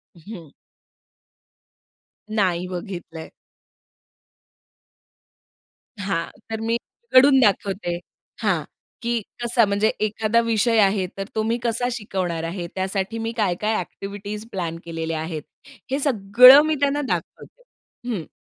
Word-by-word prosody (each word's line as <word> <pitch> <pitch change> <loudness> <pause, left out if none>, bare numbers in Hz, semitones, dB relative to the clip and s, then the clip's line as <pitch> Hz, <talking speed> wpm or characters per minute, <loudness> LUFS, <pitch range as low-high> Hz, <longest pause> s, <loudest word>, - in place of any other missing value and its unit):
हं. 170 -1 -11 1.9
नाही 180 -4 +1
बघितलंय. 175 -3 -7 2.7
हां, 185 -4 -1 0.2
तर 220 0 -3
मी 225 +1 0 0.3
उघडून 260 +3 +6
दाखवते 195 -5 +1 0.5
हां, - - +1 0.4
की 235 -1 -1 0.2
कसा 240 -1 +4
म्हणजे 205 +2 +1 0.2
एखादा 215 +2 +1
विषय 230 0 +2
आहे 195 -2 +3
तर 195 - -2
तो 220 - +1
मी 230 +2 0
कसा 240 +1 0
शिकवणार 185 -8 -3
आहे? 170 +1 -4
त्यासाठी 190 +3 -2
मी 225 0 -2
काय-काय 210 +1 0
ॲक्टिव्हिटीज 205 +3 -6
प्लॅन 170 -5 -3
केलेल्या 165 -1 -3
आहेत, 160 -1 -4 0.5
हे 270 - +1
सगळं 250 +1 +7
मी 310 0 +1
त्यांना 285 +1 +1
दाखवते, - - -5 0.5
हं. 190 -9 -3
205 Hz, 110 wpm, -23 LUFS, 180-230 Hz, 2.7 s, सगळं